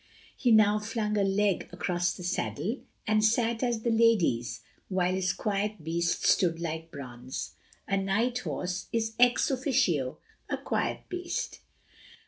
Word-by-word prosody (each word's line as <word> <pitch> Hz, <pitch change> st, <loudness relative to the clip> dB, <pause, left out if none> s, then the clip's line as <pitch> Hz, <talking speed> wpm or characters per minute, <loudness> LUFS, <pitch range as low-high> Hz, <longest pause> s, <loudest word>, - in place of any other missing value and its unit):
He 245 Hz, -, +2 dB
now 215 Hz, -1 st, +6 dB
flung 210 Hz, 0 st, -2 dB
a 205 Hz, -, +2 dB
leg 195 Hz, -1 st, +1 dB
across 175 Hz, 0 st, 0 dB
the 180 Hz, -, -7 dB
saddle, 200 Hz, +5 st, -2 dB, 0.3 s
and 215 Hz, -1 st, +2 dB
sat 230 Hz, +1 st, +2 dB
as 240 Hz, -3 st, 0 dB
the 235 Hz, -, +1 dB
ladies 180 Hz, -, +2 dB, 0.3 s
while 185 Hz, -1 st, +1 dB
his 185 Hz, -1 st, +1 dB
quiet 205 Hz, -3 st, -2 dB
beast 170 Hz, +2 st, 0 dB
stood 165 Hz, -3 st, +3 dB
like 165 Hz, -1 st, -4 dB
bronze. 130 Hz, -4 st, -7 dB, 0.4 s
A 195 Hz, -, +1 dB
night 225 Hz, +6 st, +1 dB
horse 180 Hz, -6 st, -3 dB
is 225 Hz, -1 st, -1 dB
ex 245 Hz, +3 st, +4 dB
officio 240 Hz, -, +1 dB, 0.3 s
a -, -, -1 dB
quiet -, -, -1 dB
beast. 360 Hz, -1 st, -4 dB
200 Hz, 140 wpm, -29 LUFS, 175-230 Hz, 0.4 s, now